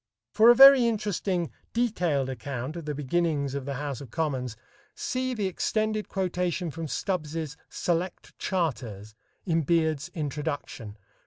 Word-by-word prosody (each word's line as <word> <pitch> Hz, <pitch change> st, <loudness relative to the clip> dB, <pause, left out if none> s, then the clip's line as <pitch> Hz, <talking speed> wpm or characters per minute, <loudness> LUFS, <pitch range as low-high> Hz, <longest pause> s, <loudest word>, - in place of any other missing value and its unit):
For 225 Hz, +2 st, +7 dB
a 240 Hz, -, +9 dB
very 270 Hz, -2 st, +9 dB
interesting 200 Hz, -5 st, -1 dB, 0.2 s
detailed 180 Hz, -, +1 dB
account 130 Hz, +2 st, -5 dB
of 170 Hz, -3 st, -6 dB
the 150 Hz, -1 st, -3 dB
beginnings 150 Hz, -1 st, 0 dB
of 140 Hz, -2 st, -4 dB
the 140 Hz, -1 st, -3 dB
House 140 Hz, -1 st, -4 dB
of 135 Hz, -, -9 dB
Commons, 130 Hz, -6 st, -2 dB, 0.4 s
see 255 Hz, 0 st, -2 dB
the 210 Hz, -3 st, -1 dB
extended 215 Hz, +3 st, -1 dB
quotation 180 Hz, -2 st, -1 dB
from 165 Hz, +2 st, -5 dB
Stubbs's 155 Hz, -3 st, -3 dB
"Select 175 Hz, +1 st, -2 dB
Charters" 120 Hz, -, -2 dB, 0.3 s
in 165 Hz, -3 st, +2 dB
Beard's 160 Hz, 0 st, +1 dB
"Introduction," 145 Hz, -7 st, -4 dB
pp. -, -, -23 dB
160 Hz, 140 wpm, -27 LUFS, 140-190 Hz, 0.4 s, a